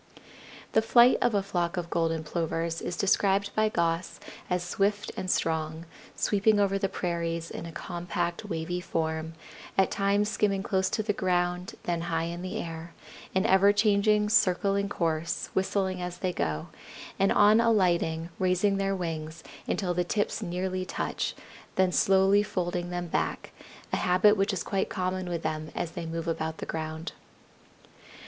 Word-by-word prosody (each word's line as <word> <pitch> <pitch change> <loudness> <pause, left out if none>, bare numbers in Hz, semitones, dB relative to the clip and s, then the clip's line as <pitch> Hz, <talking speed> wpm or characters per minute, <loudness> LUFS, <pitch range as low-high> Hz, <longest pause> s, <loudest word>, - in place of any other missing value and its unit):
The 220 - +4
flight 240 +2 +6
of 240 -3 +2
a 200 - +2
flock 180 -2 -1
of 170 -1 -4
Golden 165 -1 0
Plovers 165 +1 -2
is 175 - -4
described 200 +1 +2
by 215 0 +2
Goss 170 -2 -1 0.3
as 180 -1 0
swift 200 +3 0
and 185 - -4
strong, 160 -1 -1 0.3
sweeping 210 +1 +2
over 195 -1 +2
the 195 - 0
prairies 170 -2 -3
in 170 - -6
a - - -7
compact, 175 +1 -3
wavy 170 +2 -3
form, 160 -1 -2 0.4
at 190 -1 +3
times 200 +1 +2
skimming 200 -2 0
close 190 -2 +1
to 215 - -1
the 210 0 0
ground, 180 -1 -1
then 170 -1 -1
high 165 -1 -1
in 170 +1 -4
the 185 0 -4
air; 165 0 -6 0.4
an 190 - +3
everchanging, 205 +2 +4
circling 200 0 +2
course, 165 -3 -2
whistling 190 -1 0
as 180 0 -4
they 180 0 -2
go; 75 - -2 0.5
and 195 0 +3
on 210 +2 +6
alighting 175 -7 +2
raising 190 +2 +2
their 195 0 0
wings 160 -3 -5 0.2
until 180 -3 0
the 180 0 +1
tips 205 +5 -1
nearly 185 0 -2
touch, - - -3 0.4
then 185 -1 +3
slowly 195 +2 +4
folding 175 -3 -2
them 175 0 -3
back, 170 - -2 0.4
a - - +3
habit 185 +4 +4
which 195 +1 +1
is 190 - -2
quite 195 -1 -1
common 185 -1 -2
with 170 -2 -3
them 155 0 -3
as 165 - -2
they 170 0 -5
move 165 0 -4
about 160 -1 -2
the - - -5
ground. 160 +1 -4
180 Hz, 160 wpm, -28 LUFS, 165-195 Hz, 0.5 s, flight